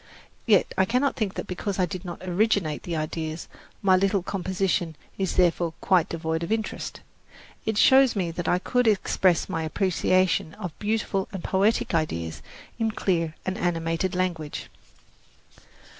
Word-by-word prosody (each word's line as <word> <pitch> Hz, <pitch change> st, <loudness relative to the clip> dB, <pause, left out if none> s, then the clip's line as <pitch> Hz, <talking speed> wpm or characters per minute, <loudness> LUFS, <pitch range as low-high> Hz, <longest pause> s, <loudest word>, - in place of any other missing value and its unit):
Yet 205 Hz, -4 st, +4 dB
I 190 Hz, -, +5 dB
cannot 255 Hz, +6 st, +1 dB
think 210 Hz, -5 st, -2 dB
that -, -, -4 dB
because 190 Hz, +2 st, -3 dB
I 185 Hz, -, +3 dB
did 180 Hz, +2 st, -6 dB
not 175 Hz, -1 st, -7 dB
originate 185 Hz, -4 st, +1 dB
the 170 Hz, -, -4 dB
ideas, 155 Hz, +1 st, -3 dB, 0.4 s
my 190 Hz, -1 st, +6 dB
little 195 Hz, 0 st, +2 dB
composition 185 Hz, -3 st, -1 dB, 0.2 s
is 190 Hz, -2 st, -1 dB
therefore 170 Hz, -2 st, +2 dB
quite 180 Hz, -3 st, +3 dB
devoid 160 Hz, 0 st, -2 dB
of 170 Hz, -, -4 dB
interest. 220 Hz, -1 st, -3 dB, 0.7 s
It 220 Hz, -1 st, 0 dB
shows 265 Hz, +1 st, +6 dB
me 180 Hz, -4 st, -1 dB
that 170 Hz, 0 st, -4 dB
I 180 Hz, -, +3 dB
could 250 Hz, +6 st, +1 dB
express 190 Hz, -4 st, +2 dB
my 165 Hz, -4 st, -2 dB
appreciation 185 Hz, 0 st, +1 dB
of 180 Hz, -, -5 dB
beautiful 210 Hz, -2 st, -1 dB
and 190 Hz, -3 st, -6 dB
poetic 200 Hz, +2 st, +1 dB
ideas 85 Hz, -, -1 dB, 0.4 s
in 225 Hz, -1 st, +1 dB
clear 165 Hz, -7 st, -1 dB
and 190 Hz, +2 st, -2 dB
animated 165 Hz, 0 st, -1 dB
language. 170 Hz, -5 st, -2 dB
185 Hz, 150 wpm, -26 LUFS, 165-200 Hz, 0.7 s, my